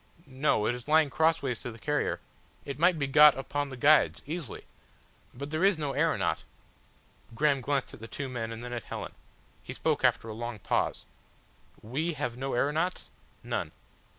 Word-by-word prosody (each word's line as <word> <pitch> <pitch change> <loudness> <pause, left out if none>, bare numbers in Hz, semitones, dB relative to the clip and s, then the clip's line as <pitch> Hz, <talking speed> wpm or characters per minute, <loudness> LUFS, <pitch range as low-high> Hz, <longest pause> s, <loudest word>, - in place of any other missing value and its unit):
"No. 130 -5 +1
It 120 - +2
is 125 +1 -8
lying 155 -2 +4
crossways 140 -7 +1
to - - -6
the 115 - -11
carrier. 145 +5 -1 0.5
It 140 0 -6
might 175 +1 +5
be 145 - 0
got 150 +1 +7
upon 145 +1 -2
the 130 - -8
guides 150 +4 +4
easily. 155 - -6 0.7
But 140 +4 -7
there 155 +3 0
is 195 -3 +5
no 150 -3 -2
aeronaut - - +1 0.5
." 115 - -23
Graham 140 +1 +2
glanced 140 0 -1
at - - -11
the 115 - -8
two 140 +4 -5
men 120 -3 -4
and 115 +1 -7
then 125 0 -6
at 120 -4 -5
Helen. - - -6 0.5
He - - -7
spoke - - 0
after - - +3
a 110 - -5
long 120 +1 -5
pause. 100 - -1 0.8
"We 150 +10 -2
have 125 -5 -3
no 135 +2 -3
aeronauts?" 155 +8 0 0.3
"None." - - -3
140 Hz, 180 wpm, -29 LUFS, 120-150 Hz, 0.8 s, got